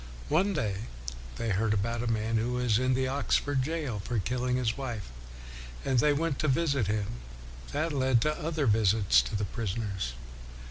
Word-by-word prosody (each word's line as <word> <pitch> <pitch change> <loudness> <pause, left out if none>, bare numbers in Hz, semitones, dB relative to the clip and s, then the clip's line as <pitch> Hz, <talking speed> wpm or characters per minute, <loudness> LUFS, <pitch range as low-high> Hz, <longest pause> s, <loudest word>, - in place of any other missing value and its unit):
One 190 +7 +3
day 105 0 -2 0.5
they 115 -1 -2
heard 105 +2 +2
about 115 +3 -1
a 120 - -2
man 110 0 0
who 120 +3 0
was 125 -3 +2
in 130 0 +2
the 130 0 +1
Oxford 140 0 +1
jail 145 -6 -2
for 120 - -2
killing 125 +5 0
his 120 -3 0
wife, 120 - -5 0.7
and 130 -2 +3
they 150 +4 +4
went 145 0 0
to 155 - +1
visit 140 - +2
him. 105 0 0 0.7
That 155 +2 -1
led 130 -3 +3
to 150 +3 +1
other 155 -2 -1
visits 105 - +4
to - - -5
the 105 0 0
prisoners. 100 - -3
120 Hz, 175 wpm, -29 LUFS, 105-140 Hz, 0.7 s, they